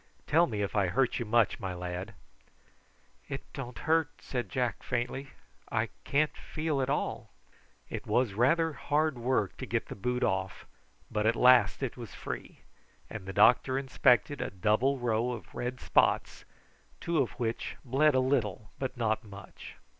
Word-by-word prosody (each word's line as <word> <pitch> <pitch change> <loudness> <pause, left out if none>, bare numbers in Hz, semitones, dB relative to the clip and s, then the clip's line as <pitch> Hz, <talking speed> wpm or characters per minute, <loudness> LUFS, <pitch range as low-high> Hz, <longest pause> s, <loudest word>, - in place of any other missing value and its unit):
"Tell 170 +3 +4
me 105 -4 -2
if 100 - -3
I 100 -3 +3
hurt 120 +8 +1
you 120 - -2
much, 115 0 +2
my 95 -2 -4
lad." 90 +4 -5 1.1
"It 135 - -4
don't 125 -4 -6
hurt," 160 -2 +2
said 125 -2 -4
Jack 125 -3 -1
faintly. 125 +3 -3 0.4
"I - - 0 0.2
can't 150 +2 +1
feel 155 -3 -2
at 130 - -1
all." 145 - -2 0.6
It - - -6
was 120 -5 +2
rather 160 +9 +3
hard 145 -1 0
work 120 -5 0
to - - -6
get - - -1
the - - -5
boot 125 +5 -1
off; 95 0 -1 0.5
but 105 0 +1
at 115 - +3
last 125 +3 +5
it 125 - -3
was 120 -4 -8
free, - - -7 0.5
and 100 -3 -7
the - - -3
doctor 125 +5 +5
inspected 130 0 +2
a - - -2
double 110 +8 +1
row 120 0 0
of 115 - -9
red 125 +1 -4
spots, - - +1 0.5
two 170 -2 0
of 130 - 0
which 115 -2 -3
bled 140 +3 +3
a - - +5
little, 115 -6 0
but 130 -1 -3
not 110 -1 0
much. 100 -3 -11
125 Hz, 165 wpm, -30 LUFS, 110-135 Hz, 1.1 s, last